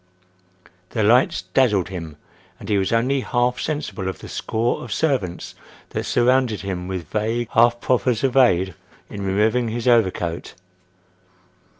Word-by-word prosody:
The 110 - +2
lights 115 -4 +3
dazzled 95 -2 +1
him, 85 -5 -7 0.4
and - - -9
he 105 -2 +2
was 95 - -1
only 130 +4 +1
half 125 0 0
sensible 105 -11 -3
of 95 - -3
the - - -11
score 115 +2 -2
of 120 - -9
servants 105 - -1 0.4
that - - -4
surrounded 125 -3 +2
him 90 -2 -4
with 90 -5 -5
vague, 115 +2 -1
half 120 +1 +4
proffers 125 -2 +1
of 135 -2 +1
aid 95 -8 +4 0.4
in 100 -1 -5
removing 110 +5 +1
his 115 +2 -3
overcoat. 95 -8 +1
110 Hz, 140 wpm, -22 LUFS, 95-125 Hz, 0.4 s, half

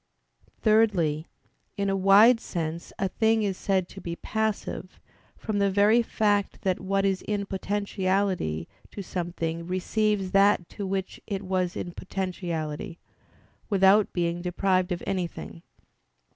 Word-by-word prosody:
Thirdly, 195 -9 +3 0.5
in 200 0 0
a 195 - +1
wide 200 +5 +6
sense 170 -4 -4
a 195 - 0
thing 220 +3 +2
is 195 -2 0
said 190 -1 0
to 195 - -10
be 170 -1 -4
passive, 220 -2 -3 0.4
from 210 -2 -2
the 200 0 +3
very 205 +4 +4
fact 205 -3 0
that 185 -2 +1
what 195 +1 0
is 190 -1 +1
in 205 -1 -2
potentiality 190 - -1 0.2
to 200 - -7
something 170 -2 -4
receives 195 +1 0
that 195 -3 +4
to 200 - -5
which 190 0 -3
it 200 -2 -3
was 185 -1 -1
in 175 - -4
potentiality, 170 -4 -4 0.7
without 200 +1 +4
being 175 -1 -1
deprived 185 +1 +1
of 175 - -3
anything. 175 -2 -4
190 Hz, 130 wpm, -27 LUFS, 175-205 Hz, 0.7 s, wide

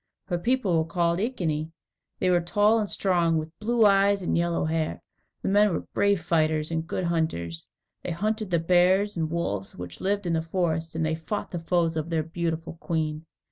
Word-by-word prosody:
Her 175 -2 -2
people 210 -5 +1
were 160 +1 -2
called 170 0 +1
Iceni. 165 -9 -1 0.5
They 185 - +1
were 175 -1 +3
tall 205 +6 +3
and 210 -2 -2
strong, 170 -4 +2
with 155 0 -4
blue 230 +1 +3
eyes 200 -1 +4
and - - 0
yellow 170 -2 +1
hair. 160 0 -1 0.4
The - - -2
men 205 +1 +4
were 165 - -3
brave 200 -3 +2
fighters 155 -2 +1
and 165 0 -2
good 185 - -2
hunters. 160 - -2 0.3
They - - -5
hunted 215 +4 -1
the 170 - +2
bears 185 +4 +3
and 160 -2 -1
wolves 100 - -3
which 90 -1 -8
lived 200 +1 0
in 170 - 0
the 160 - +1
forests, 165 -1 -1
and 160 0 0
they 155 - 0
fought 165 +6 -4
the 175 - -3
foes 165 -1 +1
of 160 +1 -2
their 160 -2 0
beautiful 165 0 -3
queen. 160 -1 -2
170 Hz, 195 wpm, -26 LUFS, 160-195 Hz, 0.5 s, eyes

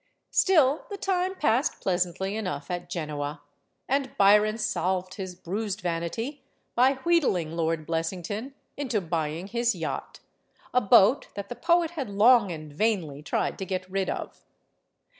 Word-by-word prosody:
Still, 310 -6 +3
the 405 - -5
time 375 -1 0
passed 270 -4 +1
pleasantly 185 +2 -1
enough 185 -7 -4
at 175 0 -4
Genoa; 150 -4 -4 0.4
and 270 0 -1
Byron 210 +2 +5
salved 185 -4 -1
his 185 -3 -6
bruised 200 +3 -4
vanity 180 - -3 0.3
by 255 +3 +4
wheedling 265 - +2
Lord 165 -1 -1
Biessington 180 - -3 0.2
into 255 -6 -1
buying 165 -1 -2
his 235 +3 0
yacht - - -5 0.5
a 250 - +4
boat 205 +6 +5
that 200 -1 -6
the 245 - -5
poet 335 +5 +2
had 285 -9 -4
long 210 0 +5
and 155 -3 -8
vainly 165 -6 0
tried 150 - -2
to 190 - -3
get 185 -1 -3
rid 195 0 0
of. - - -5
195 Hz, 140 wpm, -27 LUFS, 175-250 Hz, 0.5 s, Byron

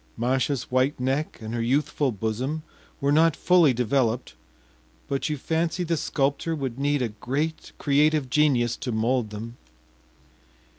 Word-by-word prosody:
Masha’s 130 +3 0
white 130 +3 +1
neck 135 +4 -1
and 110 +1 -6
her 120 - -1
youthful 140 +3 +1
bosom 120 +9 -3 0.4
were 140 0 +1
not 160 +1 +4
fully 175 -5 +4
developed, 125 0 0 0.7
but 135 +2 -1
you 150 - -1
fancy 165 +5 -1
the 170 -1 0
sculptor 145 +2 -1
would 135 -4 -4
need 145 -1 +1
a 120 - -1
great 140 +9 -3
creative 150 0 +2
genius 125 -4 +2
to 125 - -4
mold 115 +1 0
them. 115 +3 -7
135 Hz, 140 wpm, -25 LUFS, 120-150 Hz, 0.7 s, not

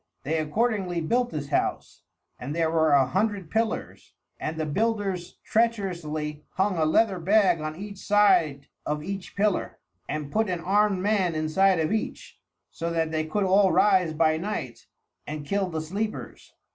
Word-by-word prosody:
They 160 +4 0
accordingly 185 +2 0
built 240 +10 +1
this 145 -6 -5
house, - - -2 0.4
and 140 +5 -5
there 165 -1 +1
were 160 -2 +3
a 135 -2 +5
hundred 195 - -1
pillars, 225 0 -3 0.2
and 160 +1 -4
the 155 - -1
builders 195 +1 -1
treacherously 170 -10 -1
hung 190 0 +1
a 160 -2 +1
leathern 185 +2 +2
bag 190 -3 +4
on 155 0 -4
each 200 +2 -8
side 180 -10 +3 0.2
of 150 0 -3
each 195 +1 -6
pillar 205 -1 0 0.3
and 150 -2 -4
put 220 -1 +1
an 180 -2 -1
armed 195 +2 +2
man 195 -5 +1
inside 165 +4 +2
of 160 +2 0
each, 220 0 -4 0.3
so 170 - -4
that 165 -1 -1
they 155 0 -1
could 205 +6 0
all 190 0 +4
rise 185 -5 +3
by 155 0 +3
night 200 +6 -5 0.4
and 150 0 -5
kill 195 +3 0
the 160 -2 -3
sleepers. 200 +7 -5
180 Hz, 160 wpm, -26 LUFS, 155-205 Hz, 0.4 s, a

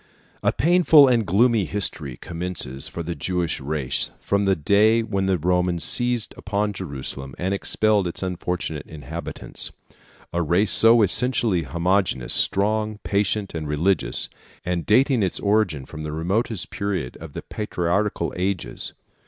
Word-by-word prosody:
A - - +2
painful 160 -3 +5
and 120 -5 +2
gloomy 110 +2 +3
history 75 -11 -3
commences 85 -6 -3
for 85 - -6
the 85 +1 -3
Jewish 85 +3 -2
race 70 -2 -2
from 100 0 0
the 95 -1 +3
day 105 +8 +3
when 100 -4 -1
the 95 -1 +2
Romans 90 0 0
seized 120 -2 +3
upon 105 +1 -2
Jerusalem 70 -6 -6
and 95 +2 -1
expelled 105 0 +1
its 85 - -4
unfortunate 90 -4 -3
inhabitants, 80 +2 -5 0.6
a 85 - 0
race 90 +6 +2
so 115 0 +6
essentially 110 -2 +2
homogeneous, 85 -2 0
strong, 105 +2 +1
patient, 100 0 0
and 80 -2 -4
religious, 85 +6 +1 0.4
and 90 -2 -2
dating 125 +3 +4
its 95 -3 -1
origin 100 -9 +1
from 80 +3 -9
the 75 0 -5
remotest 95 +7 -2
period 100 -11 -3
of 80 -3 -9
the - - -6
patriarchal 100 -2 -2
ages. 90 -8 -3
95 Hz, 140 wpm, -23 LUFS, 85-105 Hz, 0.6 s, so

